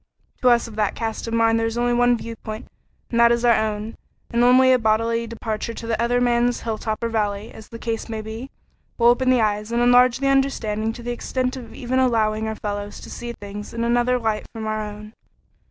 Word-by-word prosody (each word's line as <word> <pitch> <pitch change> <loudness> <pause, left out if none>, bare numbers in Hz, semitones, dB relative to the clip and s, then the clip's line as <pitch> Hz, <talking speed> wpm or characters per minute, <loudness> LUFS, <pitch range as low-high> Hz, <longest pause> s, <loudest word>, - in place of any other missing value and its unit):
To 255 - +5
us 235 0 +3
of 225 - -11
that 210 -2 0
cast 225 0 -4
of 230 - -4
mind 225 0 +3
there 225 - +1
is 225 +1 -4
only 240 0 +1
one 245 0 +3
viewpoint 225 0 -7 0.5
and 235 - +1
that 235 0 +6
is 235 0 +1
our 235 - +6
own, 215 0 -2 0.4
and 235 0 +2
only 255 +1 +6
a 255 - +3
bodily 230 +1 +1
departure 225 0 -4
to - - -7
the 225 -1 -1
other 245 +1 +2
man's 240 0 +2
hilltop 220 0 -3
or - - +1
valley, 210 -2 -2
as 220 - -12
the 230 - -8
case 230 0 -4
may 220 -1 -3
be, 225 +5 -7 0.5
will 235 0 +5
open 255 +2 +3
the 255 -2 +4
eyes 210 +1 -1
and 235 - +1
enlarge 245 0 +5
the 275 - -3
understanding 230 -6 +1
to 240 - -10
the 240 - -3
extent 255 +2 -2
of 250 -3 -9
even 255 +1 -1
allowing 220 -3 +1
our 220 - -3
fellows 205 -1 -5
to - - -10
see 240 0 -6
things 205 0 -8
in 230 - -1
another 240 +1 +2
light 220 -3 -2
from 225 -1 -6
our 215 0 -2
own. 210 +1 -9
230 Hz, 225 wpm, -22 LUFS, 220-240 Hz, 0.5 s, that